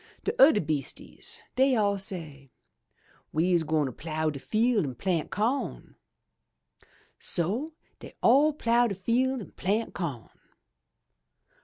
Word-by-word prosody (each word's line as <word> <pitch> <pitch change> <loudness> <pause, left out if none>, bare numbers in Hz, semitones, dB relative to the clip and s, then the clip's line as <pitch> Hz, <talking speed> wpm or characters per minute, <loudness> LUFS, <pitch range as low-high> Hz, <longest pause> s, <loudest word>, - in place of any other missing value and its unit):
* - - -33
'*De - - -1
udder 315 - +7
beastises 155 - -4
dey 265 +1 +4
all 205 -3 +2
say, 160 -8 -5 0.8
*We's 170 +2 +2
gwine 155 -4 0
plough 155 +1 -2
de 140 - -7
field 225 - +1
an' 130 -4 -4
plant 170 +2 -1
co*n/ 235 +7 -2 1.2
So 220 - -1 0.3
dey - - -12
all 280 +6 +6
plough 240 -4 +2
de 200 - -3
field 245 +6 0
an' - - -10
plant 210 +5 -1
co'n. 145 -10 -5
195 Hz, 125 wpm, -28 LUFS, 155-240 Hz, 1.2 s, udder